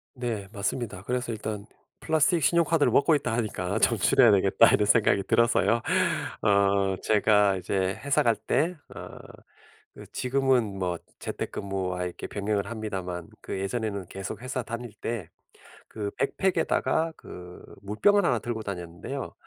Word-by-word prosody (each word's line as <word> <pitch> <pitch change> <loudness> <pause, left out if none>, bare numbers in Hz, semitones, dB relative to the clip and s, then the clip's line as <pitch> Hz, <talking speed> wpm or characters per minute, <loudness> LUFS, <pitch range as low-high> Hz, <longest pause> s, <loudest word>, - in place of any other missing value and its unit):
네 115 -5 -4
맞습니다. 100 -1 -3
그래서 125 +1 -2
일단 105 -1 -5 0.3
플라스틱 160 0 +2
신용카드를 165 -2 +3
먹고 155 +2 +4
있다 125 -5 -1
하니까 105 -3 -2
'좀 115 - +3
줄여야 120 +3 +5
되겠다.' 100 +3 +5
이런 105 - +3
생각이 105 -2 +3
들어서요. 115 +1 +2 0.6
어 100 -1 +3
제가 105 -2 +3
이제 95 +1 -1
회사 140 0 +2
갈 115 -2 +3
때 165 - 0 0.2
어 - - -8 1.0
지금은 125 -5 +1
뭐 90 -2 -1 0.2
재택근무와 95 -2 -3
이렇게 90 - -6
병행을 100 0 -2
합니다만 95 -6 -5
그 95 - -5
예전에는 100 -2 -3
계속 95 +3 -6
회사 130 0 -3
다닐 115 0 -6
때 110 -5 -5 0.6
그 105 -2 -5
백팩에다가 165 0 0
그 90 0 -11 0.2
물병을 200 - +3
1 120 - +2
들고 115 0 -4
다녔는데요. 85 -3 -6
110 Hz, 310 characters per minute, -27 LUFS, 95-125 Hz, 1.0 s, 줄여야